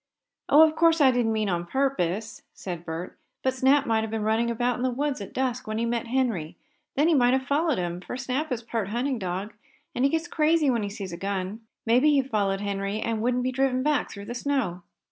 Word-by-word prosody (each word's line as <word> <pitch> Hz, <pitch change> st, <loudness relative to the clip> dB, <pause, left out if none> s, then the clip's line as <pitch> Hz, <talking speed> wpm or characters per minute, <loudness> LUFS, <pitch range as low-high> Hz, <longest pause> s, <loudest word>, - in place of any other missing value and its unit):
"Oh, 305 Hz, +2 st, +8 dB
of 310 Hz, -, -4 dB
course 330 Hz, 0 st, +4 dB
I 270 Hz, -3 st, +6 dB
didn't 245 Hz, -3 st, +1 dB
mean 215 Hz, -1 st, 0 dB
on 175 Hz, -2 st, -1 dB
purpose," 220 Hz, -5 st, -1 dB
said 175 Hz, -3 st, -6 dB
Bert. 165 Hz, +2 st, -6 dB, 0.2 s
"But 260 Hz, -, +2 dB
Snap 270 Hz, +2 st, +3 dB
may 225 Hz, -3 st, +2 dB
have 220 Hz, -, -3 dB
been 220 Hz, -1 st, -2 dB
running 220 Hz, +2 st, +1 dB
about 240 Hz, +1 st, 0 dB
in -, -, -5 dB
the 255 Hz, -, +1 dB
woods 275 Hz, -1 st, -2 dB
at 200 Hz, -, -7 dB
dusk 255 Hz, -2 st, -2 dB
when 215 Hz, 0 st, -2 dB
he 230 Hz, -, 0 dB
met 235 Hz, 0 st, -2 dB
Henry. 230 Hz, -11 st, -1 dB, 0.4 s
Then 295 Hz, +3 st, +3 dB
he 335 Hz, -, +4 dB
may 245 Hz, -4 st, +4 dB
have 265 Hz, 0 st, +1 dB
followed 295 Hz, +1 st, +1 dB
him, 175 Hz, 0 st, -3 dB
for 250 Hz, -, -6 dB
Snap 260 Hz, +4 st, -2 dB
is 235 Hz, -2 st, -2 dB
part 225 Hz, -3 st, -2 dB
hunting 245 Hz, +4 st, -1 dB
dog, 190 Hz, +3 st, -4 dB, 0.4 s
and 250 Hz, -, -1 dB
he 275 Hz, -, +5 dB
gets 325 Hz, +3 st, -1 dB
crazy 310 Hz, -3 st, +2 dB
when 235 Hz, -3 st, 0 dB
he 205 Hz, -, -3 dB
sees 200 Hz, -3 st, -6 dB
a -, -, -5 dB
gun. 195 Hz, +2 st, -3 dB, 0.3 s
Maybe 250 Hz, +6 st, +4 dB
he 275 Hz, -2 st, +3 dB
followed 205 Hz, -6 st, -1 dB
Henry, 200 Hz, +1 st, -2 dB
and 225 Hz, -1 st, -2 dB
wouldn't 250 Hz, +1 st, +1 dB
be 255 Hz, -, 0 dB
driven 255 Hz, 0 st, +1 dB
back 300 Hz, 0 st, +1 dB
through 200 Hz, -1 st, -9 dB
the 235 Hz, -, -5 dB
snow." 245 Hz, -9 st, -1 dB
235 Hz, 235 wpm, -26 LUFS, 205-265 Hz, 0.4 s, Oh